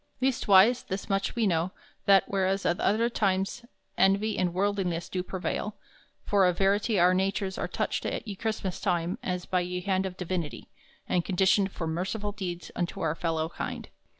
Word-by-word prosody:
Leastwise, 240 -3 +5
this 190 +1 -4
moche 195 0 0
we 235 -2 +2
know, 175 -1 +1 0.4
that, 195 -1 +7
whereas 195 0 0
at 175 - +1
other 225 +3 +2
times 200 +1 -1 0.3
envy 200 +3 +3
and 180 -1 +1
worldliness 185 -2 -1
do 185 - -2
prevail, 190 +3 -3 0.5
for 195 -2 +4
a 180 - +3
verity 200 +3 +2
our 180 +1 +5
natures 190 +1 0
are - - -2
toched - - -2
at - - -5
ye 205 - -4
Chrystmass 205 -3 -3
time 175 -2 0
as 180 -1 -3
by 185 - +1
ye 180 0 -2
hand 190 0 0
of 185 0 -8
divinity, 175 -4 -4 0.4
and 175 - +1
conditioned 190 +1 +2
for 170 - -4
merciful 190 +6 -2
deeds 180 -4 -5
unto 175 -1 -2
our 160 -2 +1
fellow 160 -1 -1
kind. - - -5
190 Hz, 175 wpm, -28 LUFS, 180-200 Hz, 0.5 s, that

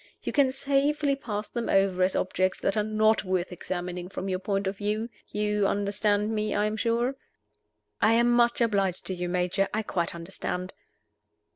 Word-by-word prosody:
You - - -3
can 280 -3 +4
safely 280 +1 +1
pass 215 -6 -4
them 235 -1 -4
over 195 -1 +3
as 185 +1 +2
objects 185 0 0
that 195 - 0
are 215 - +2
not 215 +1 +2
worth 185 -2 -1
examining 180 0 -5
from 195 0 -4
your 185 -1 -1
point 195 +1 -1
of 190 +1 -2
view. 215 +3 -2 0.2
You 210 -1 0
understand 205 +1 +1
me, 215 0 -1
I 210 - +2
am 215 0 -1
sure?" 235 +3 +1 0.9
"I 220 - +5
am 235 +1 +4
much 240 0 +3
obliged 195 -5 +1
to 190 - -2
you, 180 -1 -3
Major 180 +2 +1
I 220 - 0
quite 170 -4 -2
understand." 180 +1 -5
205 Hz, 175 wpm, -27 LUFS, 185-225 Hz, 0.9 s, I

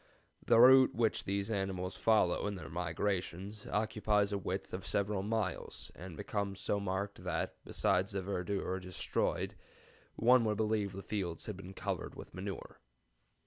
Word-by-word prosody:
The 115 -1 +5
route 130 +1 +8
which 115 -2 +1
these 100 +2 -1
animals 95 -2 -2
follow 105 -4 +3
in 105 - -2
their 80 -6 -8
migrations 95 +3 -2
occupies 105 -1 +1
a 100 - 0
width - - -4
of - - -4
several 100 -1 0
miles, 105 -3 -2
and 90 -2 -9
becomes 100 -2 -2
so 100 - 0
marked 100 +1 -3
that, - - -1
besides 95 +2 +1
the 95 -1 -2
verdure 95 0 -2
destroyed, 90 -1 -1 0.6
one 125 +1 +5
would 105 -1 +1
believe 105 -2 +1
that - - -8
the 100 - -6
fields 90 -6 -3
had 105 - -4
been 95 +1 -9
covered - - -3
with - - -10
manure. - - -6
100 Hz, 155 wpm, -34 LUFS, 95-105 Hz, 0.6 s, route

